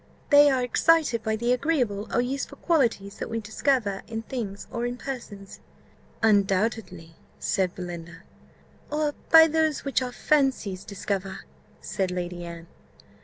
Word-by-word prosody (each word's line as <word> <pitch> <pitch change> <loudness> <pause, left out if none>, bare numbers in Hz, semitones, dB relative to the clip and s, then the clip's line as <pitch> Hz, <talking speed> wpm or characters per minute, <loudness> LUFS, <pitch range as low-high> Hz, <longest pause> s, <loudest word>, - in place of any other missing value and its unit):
"They 290 0 +8
are 260 -2 +1
excited 295 -1 +3
by 220 0 -1
the 235 +3 +1
agreeable 250 -7 0
or 240 - +2
useful 265 +3 -4
qualities 230 - 0
that - - -4
we 225 - -2
discover 220 -1 0
in 225 0 -5
things 220 -6 -5
or 235 0 -2
in 245 0 -4
persons." 225 -8 -8 0.6
"Undoubtedly," 200 -5 +1 0.2
said 190 -4 0
Belinda. 170 -1 -8 0.7
"Or 300 0 0 0.2
by 320 0 +9
those 315 -2 0
which 275 -1 +1
our 250 -1 -3
fancies 255 -9 0
discover," 195 -1 -4 0.4
said 190 -2 -2
Lady 175 -1 -4
Anne. 170 -1 -8
225 Hz, 135 wpm, -26 LUFS, 195-270 Hz, 0.7 s, by